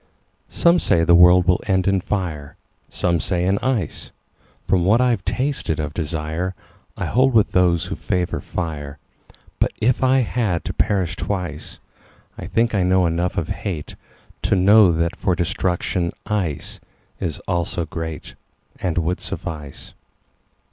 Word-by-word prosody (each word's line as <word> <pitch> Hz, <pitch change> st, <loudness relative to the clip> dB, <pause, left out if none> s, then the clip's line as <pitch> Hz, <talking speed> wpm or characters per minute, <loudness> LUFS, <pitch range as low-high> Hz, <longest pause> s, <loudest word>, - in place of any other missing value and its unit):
SOME 170 Hz, +1 st, +3 dB
say 80 Hz, -, +2 dB
the 85 Hz, -, +4 dB
world 90 Hz, +1 st, +6 dB
will 90 Hz, -, +3 dB
end 95 Hz, -1 st, +1 dB
in 95 Hz, -1 st, +2 dB
fire, 85 Hz, -8 st, -4 dB, 0.3 s
Some 85 Hz, -1 st, 0 dB
say 90 Hz, +1 st, -1 dB
in 95 Hz, +2 st, +1 dB
ice. 125 Hz, -, -2 dB, 0.6 s
From 90 Hz, -3 st, +2 dB
what 105 Hz, +6 st, +4 dB
I've 120 Hz, -6 st, +2 dB
tasted 130 Hz, -, -1 dB
of 75 Hz, -1 st, -3 dB
desireI 80 Hz, +3 st, -3 dB, 0.5 s
hold 130 Hz, +2 st, +2 dB
with 110 Hz, -, +4 dB
those 85 Hz, -2 st, +2 dB
who 95 Hz, +2 st, -4 dB
favor 90 Hz, -3 st, -2 dB
fire. 75 Hz, -4 st, -5 dB, 0.6 s
But -, -, +1 dB
if 125 Hz, +4 st, +1 dB
it 130 Hz, 0 st, +4 dB
had 105 Hz, -8 st, -1 dB
to -, -, -3 dB
perish 95 Hz, -6 st, 0 dB
twice,I 90 Hz, -6 st, -7 dB
think 115 Hz, +1 st, +1 dB
I 100 Hz, -, +2 dB
know 90 Hz, 0 st, +3 dB
enough 85 Hz, +2 st, -1 dB
of -, -, -1 dB
hateTo 90 Hz, +2 st, -5 dB
know 100 Hz, +1 st, +6 dB
that 85 Hz, 0 st, 0 dB
for 90 Hz, -, 0 dB
destruction 85 Hz, 0 st, -1 dB
iceIs 85 Hz, -3 st, -5 dB
also 85 Hz, -1 st, -1 dB
greatAnd 80 Hz, +1 st, -7 dB
would 85 Hz, +2 st, 0 dB
suffice. 75 Hz, -4 st, -7 dB
90 Hz, 135 wpm, -21 LUFS, 85-100 Hz, 0.6 s, world